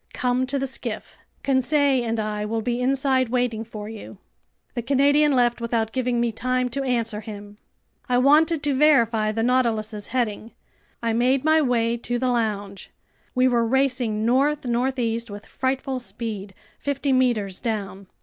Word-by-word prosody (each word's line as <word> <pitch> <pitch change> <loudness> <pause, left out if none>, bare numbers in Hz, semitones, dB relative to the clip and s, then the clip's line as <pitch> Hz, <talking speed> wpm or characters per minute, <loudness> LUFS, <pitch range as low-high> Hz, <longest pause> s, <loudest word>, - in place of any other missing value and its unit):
Come 250 0 0
to 280 - -1
the 270 - -1
skiff. 265 - -6 0.2
Conseil 270 0 +2
and 230 -1 -2
I 210 -1 -2
will 225 +1 -2
be 240 +2 -1
inside 265 -1 +1
waiting 245 -2 0
for 215 -2 -8
you." 220 -2 -9 0.6
The 240 - -2
Canadian 285 +4 +3
left 240 -1 +2
without 230 -1 -1
giving 250 -1 0
me 235 -1 +1
time 255 +3 -1
to 275 +3 -3
answer 230 -4 -1
him. 205 -1 -10 0.5
I 245 - +3
wanted 300 +4 +4
to 290 -1 +1
verify 235 -7 +3
the 225 +1 -1
Nautilus's 225 -4 0
heading. 225 -2 -2 0.5
I 230 -1 +1
made 255 +3 +2
my 315 0 +5
way 235 -3 +1
to 240 +1 -3
the 255 +1 0
lounge. 205 -5 -2 0.5
We 255 0 +4
were 240 -2 +2
racing 245 -3 +1
north 275 +4 +2
northeast 240 -2 -1
with 205 0 -9
frightful 260 0 -2
speed, 205 -3 -6 0.2
fifty 280 -1 -1
meters 230 -7 +1
down. 200 -4 -4
240 Hz, 160 wpm, -23 LUFS, 225-260 Hz, 0.6 s, my